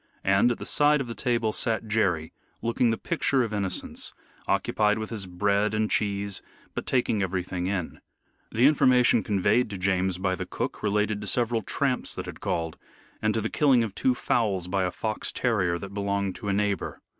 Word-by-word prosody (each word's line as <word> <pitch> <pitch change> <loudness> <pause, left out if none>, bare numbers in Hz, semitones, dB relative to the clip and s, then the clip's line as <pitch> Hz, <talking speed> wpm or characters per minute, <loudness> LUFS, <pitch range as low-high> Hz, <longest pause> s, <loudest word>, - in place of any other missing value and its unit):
And 95 +5 +4
at 120 - -2
the - - -7
side 150 0 +4
of 135 - -2
the 115 - -5
table 115 -3 0
sat 110 -1 0
Jerry, 95 -8 0 0.3
looking 115 +1 +2
the 115 - 0
picture 140 -6 +1
of 110 -2 -4
innocence, 100 -3 -4 0.3
occupied 105 0 +2
with 110 +1 -5
his 105 -4 -3
bread 100 +3 +1
and 110 0 0
cheese, 100 -2 0 0.3
but - - -5
taking 120 -5 +1
everything 90 -1 -2
in. 95 -4 -3 0.5
The 115 +4 +3
information 130 -5 +5
conveyed 105 +4 +2
to 100 - -5
James 95 -1 +1
by 95 0 0
the 95 - -4
cook - - -4
related 105 0 0
to 105 - -6
several 120 +1 +1
tramps 130 +5 0
that - - -5
had - - -8
called, 80 -1 -2 0.4
and 110 - +2
to 110 - +1
the 110 - -1
killing 135 -6 +4
of 110 -4 -4
two 125 +5 +1
fowls 100 -8 0
by 95 0 0
a - - 0
fox 110 +2 -3
terrier 95 -8 +1
that 100 +2 -8
belonged 100 -1 -1
to 105 - -7
a 100 - +1
neighbor. 100 0 -1
105 Hz, 190 wpm, -26 LUFS, 95-115 Hz, 0.5 s, information